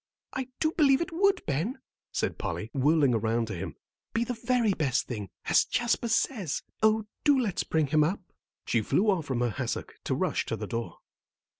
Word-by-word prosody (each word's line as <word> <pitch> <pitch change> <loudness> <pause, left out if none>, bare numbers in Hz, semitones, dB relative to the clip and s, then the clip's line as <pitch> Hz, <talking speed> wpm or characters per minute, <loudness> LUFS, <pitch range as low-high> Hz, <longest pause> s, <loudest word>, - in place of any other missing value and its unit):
"I 260 -1 -3
do 315 - +2
believe 280 -5 +4
it 340 +2 -2
would, 385 +3 +2
Ben," 165 - -1 0.3
said - - -2
Polly, 85 +7 -3
whirling 145 -1 +3
around 115 +1 +1
to - - -3
him, 85 - -5 0.4
"be 230 - +3
the 245 - -3
very 235 -2 +1
best 140 -6 0
thing, 105 -6 -5 0.2
as - - +5
Jasper 240 0 0
says. 220 - 0 0.2
Oh, 220 0 +3 0.2
do 290 -2 +5
let's 215 -8 0
bring 160 -1 +1
him 150 +2 +3
up." 175 +7 0 0.5
She 115 - +2
flew 205 - +2
off 170 -6 -1
from 125 -3 -1
her 120 -1 +1
hassock 130 0 -3
to - - 0
rush - - 0
to - - -1
the - - -5
door. 115 0 -4
170 Hz, 190 wpm, -28 LUFS, -, 0.5 s, as